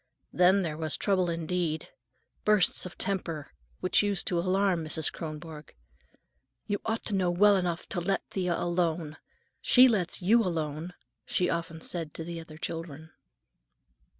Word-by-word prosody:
Then 185 +2 +4
there 155 -3 -3
was 155 -2 0
trouble 185 -3 +1
indeed: 165 -1 -2 0.5
bursts 210 -3 +3
of 180 - -13
temper 165 - -3 0.3
which - - +3
used 205 -1 0
to 175 - 0
alarm 185 -1 +1
Mrs. 155 0 0
Kronborg. 155 -1 -8 0.9
"You 205 - -2
ought 225 0 -1
to 215 - -1
know 185 -2 +2 0.2
enough 175 -3 -1
to 175 - -1
let 195 +3 -1
Thea 180 -3 -1
alone. 170 -3 -1 0.4
She 255 +1 +7
lets 200 -8 +1
you 215 +6 +4
alone," 165 -2 -3 0.3
she 180 - 0
often 165 -1 -4
said 165 -3 -4
to 165 - -3
the 170 0 -6
other 160 -1 -11
children. 160 -1 -6
175 Hz, 145 wpm, -29 LUFS, 160-190 Hz, 0.9 s, She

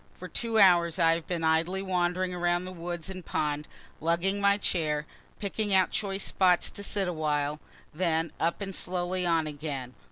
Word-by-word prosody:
For - - -9
two 230 -2 -2
hours 175 -4 +5
I 165 -2 +5
have 165 -1 -4
been 170 -2 -2
idly 165 +4 +1
wandering 180 0 0
around 175 0 0
the 185 - -6
woods 175 -2 -5
and 185 -1 -6
pond, 150 -1 -2 0.3
lugging 175 +5 0
my 200 0 +4
chair, 155 -6 0 0.3
picking 205 0 -1
out 185 -1 +4
choice 195 -2 -2
spots 180 -2 +3
to - - -8
sit 200 -1 -1
awhile 150 -3 -1 0.3
then 165 -1 0
up 170 +4 0
and 195 -1 -4
slowly 180 0 -1
on 165 -2 +2
again. 145 -4 -5
175 Hz, 170 wpm, -28 LUFS, 160-190 Hz, 0.3 s, hours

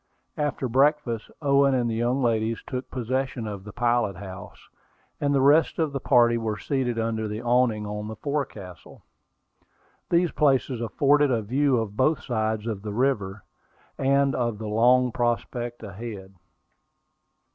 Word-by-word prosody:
After 145 -3 -1
breakfast, 135 -2 +1
Owen 140 -1 +4
and 120 -2 +1
the 115 - -1
young 120 +4 0
ladies 115 -1 0
took 130 -1 -5
possession 130 -1 -2
of 100 -3 -6
the 105 - -9
pilot 120 -3 +1
house, 95 0 -10 0.5
and 145 - 0
the 140 -1 +3
rest 150 +4 +4
of 155 -3 0
the 140 - -2
party 120 -3 +4
were 110 -2 -2
seated 130 -3 -2
under 110 -1 -1
the 105 +1 -4
awning 120 -3 +2
on 105 0 -5
the 110 - -6
forecastle. 110 - -6 1.1
These 175 0 +2
places 135 -4 +1
afforded 140 +6 +3
a 115 -4 0
view 135 +4 +2
of 110 -3 -3
both 150 +6 +1
sides 110 -2 -1
of 110 -4 -3
the 105 0 -5
river, 105 -6 -1 0.5
and 140 +1 +2
of 120 -3 -1
the 110 - -7
long 125 +4 +3
prospect 120 0 -2
ahead. 100 -2 -8
120 Hz, 150 wpm, -25 LUFS, 110-135 Hz, 1.1 s, Owen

